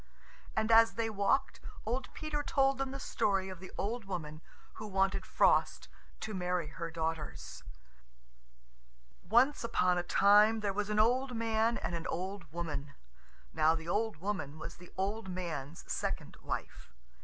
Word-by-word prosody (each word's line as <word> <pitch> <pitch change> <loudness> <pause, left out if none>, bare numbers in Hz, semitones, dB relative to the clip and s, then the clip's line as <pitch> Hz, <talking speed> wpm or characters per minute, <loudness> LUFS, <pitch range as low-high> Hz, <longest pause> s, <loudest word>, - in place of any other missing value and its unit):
And 220 +1 +2
as 225 0 +7
they 225 -1 -1
walked, 205 +6 +1 0.3
old 250 +4 -2
Peter 305 -1 -2
told 270 -2 +2
them 270 -1 -1
the 275 +1 -6
story 195 -7 0
of 185 -2 -8
the 185 - -10
old 225 +2 -2
woman 155 -5 -5 0.4
who 215 - -5
wanted 195 -1 +1
Frost - - +3 0.3
to 215 - -4
marry 180 -4 -1
her 170 +1 -5
daughters. 160 - -4 1.6
Once 250 +6 +3
upon 180 -6 +2
a - - +1
time 210 +4 +5
there 200 -2 0
were 205 +1 -2
an 210 - 0
old 250 +4 +3
man 225 +1 +1
and - - -3
an 170 +1 -3
old 185 -2 -4
woman. 145 -4 -4 0.6
Now 160 +1 +4
the 160 0 -6
old 215 +1 0
woman 160 -5 -3
was 170 - -8
the 180 0 -14
old 195 +2 -2
man's 170 -5 -5
second - - -3
wife. - - -5
195 Hz, 155 wpm, -33 LUFS, 170-225 Hz, 1.6 s, as